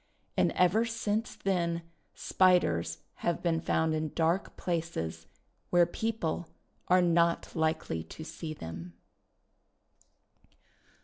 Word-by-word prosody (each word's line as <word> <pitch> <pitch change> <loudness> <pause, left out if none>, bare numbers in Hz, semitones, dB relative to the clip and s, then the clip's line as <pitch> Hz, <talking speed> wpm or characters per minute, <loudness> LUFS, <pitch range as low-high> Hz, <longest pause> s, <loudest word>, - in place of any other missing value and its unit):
And - - +3
ever 180 +5 +4
since 225 -1 -2
then 170 -3 0 0.3
Spiders 180 - +2
have 170 - -1
been 165 -2 +1
found 160 -1 +1
in 155 -1 -2
dark 170 +3 +1
places, 85 - -3 0.4
where 175 -1 +5
people 175 -3 -2 0.4
are 180 0 +5
not 170 -1 +2
likely 160 - 0
to 160 - -9
see 155 -1 -6
them. 85 - -7
170 Hz, 105 wpm, -30 LUFS, 155-180 Hz, 0.4 s, where